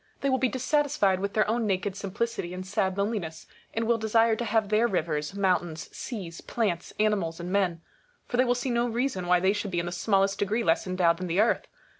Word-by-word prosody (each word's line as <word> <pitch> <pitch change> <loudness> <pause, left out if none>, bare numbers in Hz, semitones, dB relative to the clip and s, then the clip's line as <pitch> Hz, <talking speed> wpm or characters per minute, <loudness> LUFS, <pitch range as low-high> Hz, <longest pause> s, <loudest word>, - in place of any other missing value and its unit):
They 275 - +1
will 260 - +2
be 255 0 +2
dis 260 0 -4
satisfied 285 -11 +2
witli 200 +1 -2
their 215 -1 +2
own 225 0 0
naked 195 0 -1
simplicity 200 -2 -3
and 185 0 -6
sad 190 -1 0
loneli 205 +2 0
ness, 160 -1 -8 0.3
and 225 0 -1
will 230 0 +2
desire 225 +1 +3
to 240 - -3
have 215 -2 +1
their 215 +3 +3
rivers, 155 -4 -2
mountains, 175 -5 -1
seas, 185 -9 -6
plants, 195 -7 -2
animals, 195 -6 +1
and 175 +1 -5
men; 185 -4 +1 0.4
for 245 - -3
they 255 - +5
will 245 0 +2
see 245 +1 -2
no 235 0 +1
reason 235 -6 -1
why 180 0 +4
they 190 +2 +3
should 205 -1 -3
be 175 -2 -1
in 170 - -2
the 175 - -4
smallest 195 +1 +1
degree 215 +4 0
less 165 +1 +2
endowed 180 -2 +2
than 185 +1 -4
the 175 +3 0
Earth. 220 - +2
200 Hz, 230 wpm, -27 LUFS, 180-230 Hz, 0.4 s, they